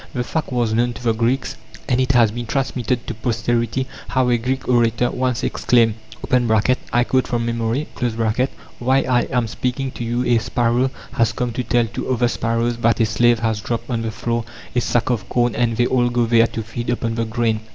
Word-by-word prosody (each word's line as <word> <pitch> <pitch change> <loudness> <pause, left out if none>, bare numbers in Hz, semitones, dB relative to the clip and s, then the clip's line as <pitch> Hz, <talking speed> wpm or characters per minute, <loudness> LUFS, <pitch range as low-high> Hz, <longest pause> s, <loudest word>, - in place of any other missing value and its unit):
The 125 - 0
fact 155 +3 -3
was 120 -3 0
known 120 +2 +1
to 115 - -11
the 115 -2 +2
Greeks, 120 +3 -1 0.3
and 125 -1 +2
it 130 +1 +1
has 115 -4 +5
been 120 +1 -5
transmitted 125 -2 -1
to - - -4
posterity 120 +3 -1 0.2
how 130 -1 +1
a 120 - +3
Greek 130 +3 -2
orator 120 -1 +2
once 125 -2 -1
exclaimed 115 -3 +2 1.0
(I 120 - +3
quote 130 +1 +1
from 120 -1 -1
memory): 115 +4 -1 0.9
"While 130 +2 +2
I 125 -1 +2
am 125 -3 0
speaking 130 +4 -2
to 120 - -6
you 120 +2 -1
a 120 -1 +3
sparrow 120 +2 +1 0.2
has 115 -1 +2
come 125 -1 -2
to 125 +2 -3
tell 120 -1 +2
to 115 - -5
other 120 -1 +2
sparrows 115 0 -1
that 115 0 +2
a 115 - +4
slave 120 +2 +3
has 110 -2 0
dropped 115 +3 -4
on 115 -2 -1
the 115 - -2
floor 115 +1 -2 0.3
a 125 - +3
sack 120 +1 +1
of 115 -5 -2
corn, 120 -1 +1
and 115 -1 0
they 120 - +3
all 120 -1 +2
go 120 -1 +1
there 115 0 +4
to 115 - -5
feed 120 +2 -5
upon 115 -1 -1
the 115 0 -1
grain." 110 -1 0
120 Hz, 205 wpm, -20 LUFS, 115-125 Hz, 1.0 s, has